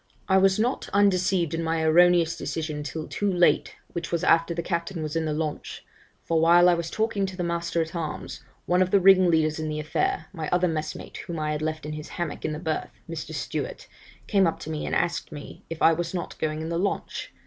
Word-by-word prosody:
'I 190 - +4
was 190 0 +4
not 240 +4 -1
undeceived 185 -4 +2
in 165 - -1
my 160 0 0
erroneous 170 +1 +5
decision 155 -2 -4
till 155 +2 -5
too 205 -1 -1
late, 175 -1 +2 0.2
which 170 -1 -5
was 170 -1 -1
after 165 +1 +4
the 170 0 -2
captain 170 -1 -3
was 155 +1 -4
in 165 -1 0
the 155 - -1
launch; 150 0 -4 0.4
for 165 -1 +1
while 175 +2 +6
I 180 - +6
was 170 -1 -2
talking 215 -2 0
to 190 -1 -8
the 180 - -2
master 170 -1 -1
at 160 +2 -10
arms, 160 -3 -5 0.2
one 180 +1 +2
of 185 - +2
the 200 - +4
ringleaders 175 -5 +4
in 155 0 -3
the 155 0 -3
affair, 380 - -1
my 160 -4 -4
other 180 0 +2
messmate 155 -2 -4
whom 170 - -6
I 155 -1 -1
had 150 0 -2
left 155 -1 -3
in 150 - -4
his 150 0 -7
hammock 170 -4 -4
in - - -1
the 150 - -3
berth 160 -1 -3 0.2
(Mr. - - -6
Stewart), - - -4 0.4
came 195 -4 +3
up 165 - -2
to 160 - -6
me, 155 - -3
and - - -1
asked 170 - -1
me, 145 -2 -10
if 165 - -4
I 165 - +7
was 170 +2 -3
not 175 - -4
going 155 0 -2
in 160 - -4
the 170 0 -1
launch? 200 +2 -3
170 Hz, 230 wpm, -26 LUFS, 155-180 Hz, 0.4 s, I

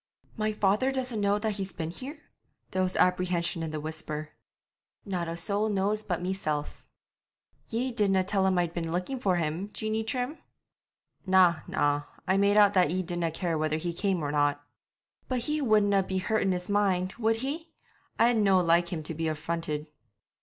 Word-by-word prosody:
'My 215 0 0
father 210 +5 +2
doesn't 255 -5 -2
know 200 0 +3
that 210 -1 -2
he's 195 -1 -3
been 160 -1 -4
here?' 270 - -8 0.5
There 185 - 0
was 185 0 0
apprehension 180 -2 +1
in 160 - -3
the 155 0 -4
whisper. 155 0 -4 0.7
'Not 180 -4 -2
a 165 0 -4
soul 205 +5 0
knows 205 +1 +1
but 180 -4 -3
meself.' 155 -6 -3 0.8
'Ye 245 +3 -1
didna 200 -5 +2
tell 195 0 +1
him 185 -1 +2
I'd 175 -1 +1
been 165 -2 -3
looking 185 +10 -2
for 190 -6 +2
him, 170 +4 -2
Jeanie 220 0 -1
Trim?' 250 +6 -2 0.9
'Na, 185 -3 +5
na, 145 0 +1 0.3
I 190 +1 +3
made 200 +1 +3
out 205 -1 +6
that 180 -5 +4
ye 185 +3 -1
didna 175 -1 -2
care 165 0 -2
whether 155 0 0
he 170 +2 -3
came 185 -2 0
or 145 - -1
not.' 145 0 +1 0.6
'But 255 -2 -1
he 300 +5 -1
wouldna 210 -5 +4
be 190 0 -3
hurt 220 +3 0
in 195 - +2
his 180 -1 -3
mind, 190 -3 +1
would 225 -1 +2
he? 295 +8 -4 0.5
I'd 235 0 +4
no 195 -3 +4
like 170 0 +3
him 170 -3 -4
to 160 - -5
be 165 +1 -2
affronted.' 155 -1 -3
185 Hz, 180 wpm, -28 LUFS, 165-210 Hz, 0.9 s, out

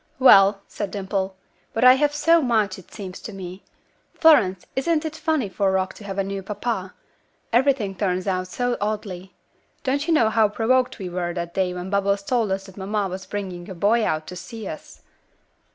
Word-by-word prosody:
"Well," 200 -6 +6
said 205 - -4
Dimple. 195 -1 -3 0.4
"But 225 - 0
I 255 0 +10
have 290 +2 +2
so 330 +3 +4
much, 215 -7 +1
it 185 - -17
seems 190 -4 -8
to - - -8
me. 185 -1 -8 0.5
Florence, 195 - +4
isn't 310 +4 +1
it 315 0 -4
funny 315 -7 0
for 195 0 0
Rock 190 0 0
to - - -13
have 195 -1 -6
a 195 - +1
new 195 0 -4
papa? 200 -1 -4 0.6
Everything 245 -5 +2
turns 185 -2 -1
out 185 -2 -1
so 245 +5 -1
oddly. 200 -3 -4 0.5
Don't 280 +3 0
you 335 - +3
know 225 -7 +3
how 220 -1 +4
provoked 250 +4 +1
we 190 - -5
were 175 -1 -3
that 170 -1 -4
day 185 -2 0
when 180 +2 -6
Bubbles 200 0 +1
told 225 -2 0
us 195 0 -2
that 190 0 -14
mamma 200 0 -1
was 190 +1 -7
bringing 185 -4 -5
a 190 - -7
boy 215 +6 +2
out 155 -5 -1
to 180 - -8
see 220 +3 -8
us?" 155 - -9
200 Hz, 195 wpm, -23 LUFS, 190-235 Hz, 0.6 s, I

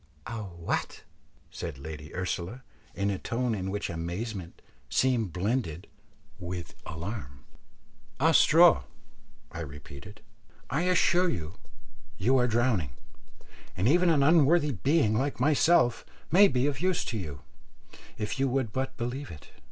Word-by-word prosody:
"A 115 -1 -5
what!" 85 -4 -4 0.5
said - - -6
Lady 75 +2 -8
Ursula, 90 +6 -3 0.3
in 100 +1 0
a 95 - -3
tone 120 0 -1
in 95 -2 -3
which 105 +1 -2
amazement 85 +3 -5 0.3
seemed 120 - +1
blended 95 -2 -2 0.5
with 90 -3 -6
alarm. 80 - -7 0.7
"A - - +4
straw," 60 - +6 0.7
I 85 - -7
repeated; 75 +5 -10 0.5
"I 155 +7 0
assure 180 0 +3
you 80 - -4 0.6
you 130 +3 +2
are 125 - +3
drowning, 110 - +1 0.8
and 95 +5 +1
even 175 +5 +4
an 150 -4 +4
unworthy 155 0 +4
being 135 - +2
like 135 +4 -1
myself 145 -2 +3 0.3
may 200 +5 +7
be 125 -4 +1
of 145 -2 -1
use 185 -1 +1
to 115 - -3
you, 75 -7 -7 0.8
if 105 +4 -3
you 135 - +2
would 125 -4 -1
but 130 0 -3
believe 125 +4 -4
it. 75 - -12
110 Hz, 135 wpm, -28 LUFS, 85-135 Hz, 0.8 s, may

